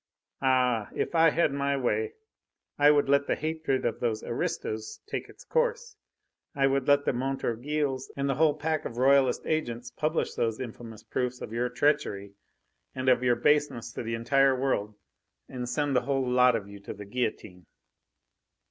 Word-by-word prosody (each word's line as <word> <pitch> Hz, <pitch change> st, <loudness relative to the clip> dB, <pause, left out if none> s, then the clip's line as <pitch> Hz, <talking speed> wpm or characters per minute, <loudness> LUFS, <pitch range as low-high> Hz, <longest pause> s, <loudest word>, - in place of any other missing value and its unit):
Ah! 125 Hz, -4 st, +2 dB
if -, -, -2 dB
I 165 Hz, 0 st, +6 dB
had 155 Hz, -2 st, +1 dB
my 140 Hz, 0 st, 0 dB
way, 425 Hz, -, -1 dB, 0.7 s
I 145 Hz, 0 st, +7 dB
would 145 Hz, -1 st, +4 dB
let 140 Hz, 0 st, +3 dB
the -, -, +1 dB
hatred 155 Hz, -3 st, -2 dB
of -, -, -1 dB
those 110 Hz, -3 st, -1 dB
aristos 110 Hz, 0 st, -3 dB
take 420 Hz, -, -5 dB
its -, -, -15 dB
course. 480 Hz, -1 st, -1 dB, 0.6 s
I 135 Hz, -1 st, +2 dB
would 135 Hz, 0 st, +1 dB
let 145 Hz, 0 st, +4 dB
the -, -, +1 dB
Montorgueils 135 Hz, +2 st, -2 dB
and 140 Hz, 0 st, 0 dB
the 135 Hz, -, +1 dB
whole 150 Hz, +1 st, +3 dB
pack 155 Hz, 0 st, -1 dB
of 115 Hz, -, -6 dB
Royalist 135 Hz, +1 st, +3 dB
agents 120 Hz, -6 st, -2 dB
publish 155 Hz, +5 st, -1 dB
those 115 Hz, -2 st, -1 dB
infamous 115 Hz, -3 st, -8 dB
proofs 125 Hz, 0 st, -2 dB
of 110 Hz, -, -7 dB
your 120 Hz, +1 st, 0 dB
treachery 125 Hz, -7 st, 0 dB, 0.6 s
and 130 Hz, 0 st, 0 dB
of 125 Hz, -1 st, +4 dB
your 125 Hz, -1 st, +3 dB
baseness 135 Hz, -4 st, +1 dB
to -, -, -5 dB
the 115 Hz, -1 st, -3 dB
entire 135 Hz, +4 st, +3 dB
world, 105 Hz, -6 st, -1 dB, 0.5 s
and 125 Hz, -1 st, -5 dB
send 145 Hz, -1 st, 0 dB
the 125 Hz, -, +4 dB
whole 135 Hz, 0 st, -1 dB
lot 125 Hz, 0 st, +4 dB
of 105 Hz, -3 st, -3 dB
you 100 Hz, 0 st, -11 dB
to 100 Hz, -, -8 dB
the 105 Hz, 0 st, -9 dB
guillotine!" 100 Hz, -5 st, -4 dB
130 Hz, 175 wpm, -28 LUFS, 120-145 Hz, 0.7 s, I